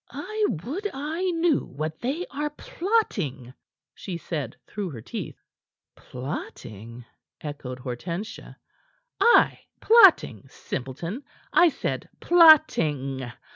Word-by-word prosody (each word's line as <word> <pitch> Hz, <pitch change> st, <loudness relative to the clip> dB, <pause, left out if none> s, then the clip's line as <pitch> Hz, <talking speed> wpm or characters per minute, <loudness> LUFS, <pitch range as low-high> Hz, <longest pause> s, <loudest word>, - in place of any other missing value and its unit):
"I 430 Hz, -1 st, -2 dB, 0.2 s
would 375 Hz, -, -4 dB
I 320 Hz, +7 st, -2 dB
knew 330 Hz, -3 st, +1 dB
what 155 Hz, +3 st, -6 dB
they 290 Hz, +9 st, -2 dB
are 295 Hz, +2 st, -2 dB
plotting," 225 Hz, -, -2 dB, 0.4 s
she 185 Hz, -4 st, -6 dB
said 150 Hz, -7 st, -5 dB
through 205 Hz, -3 st, -5 dB
her 125 Hz, -8 st, -8 dB
teeth. -, -, -6 dB, 0.6 s
"Plotting?" 120 Hz, -3 st, -8 dB, 0.3 s
echoed 145 Hz, -4 st, -7 dB
Hortensia. 165 Hz, -, -6 dB, 0.6 s
"Ay 475 Hz, -, +5 dB, 0.2 s
plotting, 380 Hz, -, +5 dB
simpleton. 165 Hz, -, -6 dB, 0.3 s
I 350 Hz, -, +6 dB
said -, -, -4 dB
plotting. 150 Hz, -, +4 dB
175 Hz, 95 wpm, -25 LUFS, -, 0.6 s, I